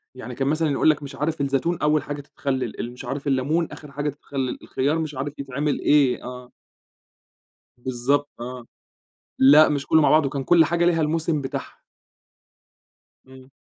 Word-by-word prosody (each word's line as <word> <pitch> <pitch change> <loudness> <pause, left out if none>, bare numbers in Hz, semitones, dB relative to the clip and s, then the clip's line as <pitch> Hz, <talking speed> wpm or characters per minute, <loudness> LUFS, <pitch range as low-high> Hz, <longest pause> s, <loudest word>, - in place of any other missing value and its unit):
يعني 125 -1 -8
كان 135 0 -1
مثلًا 155 0 +1
يقُول 140 - +3
لك 150 -1 +1
مش 140 -1 -8
عارف 150 +2 -2
الزيتون 140 +5 0
أول 150 -1 +2
حاجة 145 0 -5
تتخلل، 130 -4 -4
ال 120 - -4
مش 125 +1 -10
عارف 140 +3 -4
الليمون 140 +5 +1
آخر 150 -2 -11
حاجة 145 +1 -2
تتخلل، 135 -3 -4
الخيار 145 +5 -1
مش 155 -3 -4
عارف 140 +2 -5
يتعمل 140 +2 -2
إيه، 140 -4 +3
آه. 125 0 -9 1.3
بالضبط 130 +4 -1
آه، 125 0 -7 0.7
لأ 145 +4 +7
مش 140 -2 -2
كله 160 -1 +4
مع - - +4
بعضه 155 -3 +4
كان 135 -1 -4
كل 170 +1 +5
حاجة 170 +2 +1
ليها 170 -2 +3
الموسم 155 0 0
بتاعها. 135 - -6 1.5
إمم. 130 0 -15
140 Hz, 165 wpm, -23 LUFS, 130-150 Hz, 1.5 s, لأ